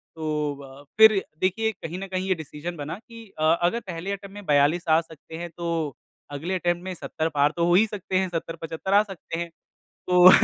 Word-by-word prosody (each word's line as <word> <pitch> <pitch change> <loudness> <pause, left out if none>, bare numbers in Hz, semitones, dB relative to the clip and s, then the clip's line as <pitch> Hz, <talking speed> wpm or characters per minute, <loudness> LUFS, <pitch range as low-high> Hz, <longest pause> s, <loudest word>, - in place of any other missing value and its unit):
तो 150 -2 -1
अ, 135 +1 -12
फिर 215 -3 +7 0.2
देखिए 220 +4 +1
कहीं 175 -2 -7
न 195 - -5
कहीं 185 0 -2
ये 185 - +2
डिसीजन 160 +2 -6
बना 145 +3 -4
कि 230 0 -13
अ, - - 0 0.2
अगर 180 +7 +2
पहले 180 -1 -5
अटेम्प्ट 200 0 -6
में 205 -2 -9
42 145 +4 +3
आ 160 - +6
सकते 160 0 -13
हैं, 175 +1 -5
तो 165 -4 -3 0.4
अगले 160 +7 -3
अटेम्प्ट 175 -1 0
में 185 0 -4
70 160 -2 -3
पार 145 0 +3
तो 170 - +3
हो 175 - +3
ही 215 +4 +6
सकते 190 -3 -2
हैं 190 -1 +1
70-75 165 +2 -4
आ 205 - +7
सकते 185 -4 -7
हैं। 170 0 -3 0.6
तो 180 0 +9
175 Hz, 205 wpm, -25 LUFS, 160-190 Hz, 0.6 s, तो